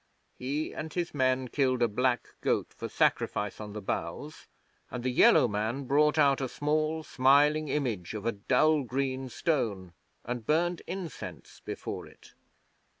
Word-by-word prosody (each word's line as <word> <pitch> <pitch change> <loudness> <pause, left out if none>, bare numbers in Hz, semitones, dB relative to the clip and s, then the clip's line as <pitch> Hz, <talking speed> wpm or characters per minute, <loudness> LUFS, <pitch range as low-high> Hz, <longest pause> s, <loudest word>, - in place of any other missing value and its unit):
He 140 +5 -3
and 155 0 -5
his 175 -1 -2
men 130 -2 +1
killed 130 -3 +1
a - - +4
black 125 +3 0
goat - - 0
for - - -6
sacrifice 105 +1 0
on 105 -1 -7
the 105 -1 -6
bows; - - -4 0.4
and 125 -1 -5
the 130 - 0
Yellow 125 - +6
Man 110 +6 -2
brought 150 +4 +3
out 140 -2 +4
a 130 - -2
small, 155 +3 0
smiling 145 +3 +4
image 120 - -2
of 105 -1 -4
dull 155 +3 +4
green 130 +1 -2
stone 105 - -1 0.3
and 120 0 -4
burned 170 +6 +1
incense 180 -3 -7
before - - -6
it. - - -18
130 Hz, 150 wpm, -29 LUFS, 120-150 Hz, 0.4 s, Yellow